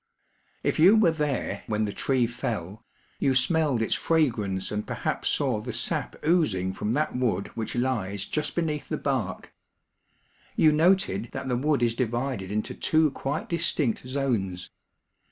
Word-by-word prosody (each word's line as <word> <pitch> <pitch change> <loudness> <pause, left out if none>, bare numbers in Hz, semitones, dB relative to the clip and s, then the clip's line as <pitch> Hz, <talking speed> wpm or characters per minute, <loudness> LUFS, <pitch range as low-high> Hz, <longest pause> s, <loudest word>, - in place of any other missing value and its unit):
If - - 0
you 185 +7 +7
were 215 -6 +5
there 145 -10 -2
when 110 0 0
the 100 - -4
tree 130 -3 +1
fell, 110 -3 -4 0.4
you 135 - +2
smelled 135 -2 +2
its - - 0
fragrance 115 - 0
and 105 0 -3
perhaps - - -2
saw 125 -7 +1
the - - -5
sap - - -1
oozing 110 - +2
from 105 +3 -2
that 150 0 0
wood 115 -7 0
which 115 +1 -4
lies 110 -6 -1
just 150 -1 -2
beneath 155 -4 -2
the 155 - -1
bark. 130 -12 -3 1.0
You 155 - +5
noted 155 - +2
that 135 - -4
the 125 - +1
wood 140 0 +1
is 115 -1 +2
divided 120 -4 -2
into 105 +1 -2
two 155 -2 +2
quite 140 +2 -3
distinct 150 -7 0
zones. 115 -10 -2
125 Hz, 155 wpm, -26 LUFS, 105-150 Hz, 1.0 s, you